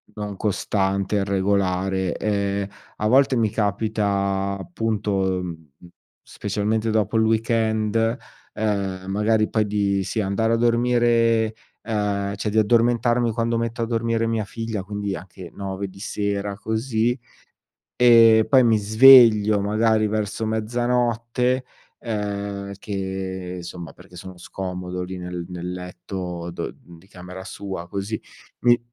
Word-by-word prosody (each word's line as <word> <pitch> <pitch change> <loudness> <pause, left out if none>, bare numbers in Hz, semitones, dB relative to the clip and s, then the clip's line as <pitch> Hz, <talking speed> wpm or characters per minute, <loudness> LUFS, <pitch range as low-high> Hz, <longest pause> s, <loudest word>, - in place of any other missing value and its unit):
non 105 -1 -5
costante, 100 0 0
irregolare. 95 -1 0
Ehm, 100 -1 -1 0.3
a 105 - 0
volte 135 +2 +4
mi 110 -2 +2
capita 100 -2 -1
appunto, 95 0 -1
mhmm, 80 -3 -7 0.5
specialmente 105 +2 -2
dopo 110 0 0
il 110 - +4
weekend, 110 +1 +1 0.4
ehm, 100 -3 -2
magari 110 +2 +1
poi, 110 -1 +1
di 100 -1 0
sì, 110 - -3
andare 105 +3 +1
a 115 - +3
dormire, 115 -1 +2 0.3
uhm, 100 -2 -1
cioè 105 +2 -3
di 110 - -2
addormentarmi 120 +2 +3
quando 115 +1 0
metto 115 0 -3
a - - +1
dormire 115 0 0
mia 115 -1 0
figlia, 115 -3 -4
quindi 100 -1 -4
anche 90 -1 -10
9 100 0 -4
di 95 +1 -14
sera, 100 -1 -3
così. 110 +2 -1 0.8
Ehm, 115 -2 +7
poi 130 -2 +5
mi 115 -2 +4
sveglio 110 -1 +7
magari 110 +1 +2
verso 110 +1 -2
mezzanotte, 120 +2 0 0.3
ehm, 100 -2 -4
che 95 -2 -5
insomma 85 -2 -8
perché - - -17
sono 95 -1 -10
scomodo 90 0 -5
lì 90 +1 -5
nel 90 -1 -6
nel 90 0 -5
letto 90 -1 -6
do - - -5
di 85 +2 -17
camera 90 0 -10
sua, 95 -4 -6
così. 100 +3 -4 0.4
Mi 120 0 +5
105 Hz, 125 wpm, -23 LUFS, 95-115 Hz, 0.8 s, Ehm